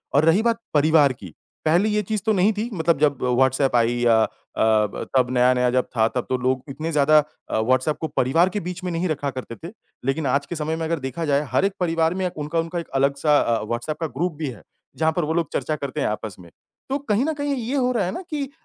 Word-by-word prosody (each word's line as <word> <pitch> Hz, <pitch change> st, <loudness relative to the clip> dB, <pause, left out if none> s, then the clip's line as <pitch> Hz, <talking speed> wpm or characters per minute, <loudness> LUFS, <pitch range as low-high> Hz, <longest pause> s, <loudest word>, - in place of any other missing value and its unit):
और 150 Hz, +2 st, +5 dB
रही 170 Hz, +6 st, +4 dB
बात 230 Hz, -1 st, +1 dB
परिवार 150 Hz, -2 st, +4 dB
की, 95 Hz, -9 st, -12 dB, 0.3 s
पहले 175 Hz, +7 st, +3 dB
ये 210 Hz, 0 st, +1 dB
चीज़ 215 Hz, +1 st, -3 dB
तो 220 Hz, -, +3 dB
नहीं 200 Hz, +3 st, +3 dB
थी, 230 Hz, +3 st, -2 dB
मतलब 165 Hz, -3 st, +1 dB
जब 145 Hz, -3 st, +2 dB
व्हाट्सऐप 130 Hz, +1 st, +2 dB
आई 120 Hz, 0 st, +3 dB
या 110 Hz, -1 st, +5 dB
अ, -, -, +1 dB, 0.3 s
ब 110 Hz, -2 st, +2 dB
तब 125 Hz, -1 st, +3 dB
नया-नया 125 Hz, 0 st, +3 dB
जब 125 Hz, 0 st, +1 dB
था 110 Hz, 0 st, +4 dB
तो 130 Hz, -, -2 dB
लोग 130 Hz, 0 st, 0 dB
इतने 155 Hz, +4 st, -4 dB
ज़्यादा 150 Hz, +1 st, +5 dB, 0.3 s
अ, -, -, 0 dB
व्हाट्सऐप 130 Hz, +6 st, +1 dB
को 160 Hz, -, -1 dB
परिवार 165 Hz, +9 st, +3 dB
के 205 Hz, -, -3 dB
बीच 180 Hz, +1 st, -6 dB
में 180 Hz, -, -2 dB
नहीं 170 Hz, +2 st, -1 dB
रखा 145 Hz, -2 st, -2 dB
करते 125 Hz, -2 st, -7 dB
थे, -, -, -9 dB, 0.3 s
लेकिन 140 Hz, +2 st, 0 dB
आज 140 Hz, +2 st, +1 dB
के 175 Hz, -, -6 dB
समय 155 Hz, +1 st, -2 dB
में 165 Hz, 0 st, -3 dB
अगर 165 Hz, -1 st, -1 dB
देखा 145 Hz, +5 st, -4 dB
जाए 145 Hz, 0 st, +1 dB
हर 195 Hz, -, +2 dB
एक 200 Hz, -, 0 dB
परिवार 165 Hz, -1 st, +1 dB
में 190 Hz, 0 st, -2 dB
अ, -, -, 0 dB
उनका 150 Hz, +3 st, -2 dB
उनका 165 Hz, +1 st, -2 dB
एक 170 Hz, -, -7 dB
अलग-सा 140 Hz, +2 st, +3 dB
अ, 115 Hz, -1 st, 0 dB
व्हाट्सऐप 120 Hz, +7 st, -3 dB
का 160 Hz, -, 0 dB
ग्रुप 175 Hz, 0 st, 0 dB
भी 155 Hz, -, -2 dB
है, 110 Hz, -9 st, -10 dB, 0.4 s
जहाँ 160 Hz, 0 st, +2 dB
पर 175 Hz, -, -1 dB
वो 160 Hz, -, -1 dB
लोग 170 Hz, -1 st, 0 dB
चर्चा 155 Hz, -, -1 dB
करते 140 Hz, 0 st, -4 dB
हैं -, -, +1 dB
आपस 105 Hz, -2 st, -4 dB
में, 85 Hz, -1 st, -14 dB, 0.4 s
तो 275 Hz, -, 0 dB
कहीं 215 Hz, +7 st, +2 dB
न 320 Hz, -, 0 dB
कहीं 285 Hz, -1 st, -2 dB
ये 250 Hz, +3 st, -3 dB
हो 255 Hz, -2 st, +2 dB
रहा 215 Hz, -7 st, 0 dB
है 185 Hz, -, -2 dB
ना 295 Hz, -, -5 dB
कि 285 Hz, -3 st, -3 dB
155 Hz, 255 wpm, -23 LUFS, 130-180 Hz, 0.4 s, और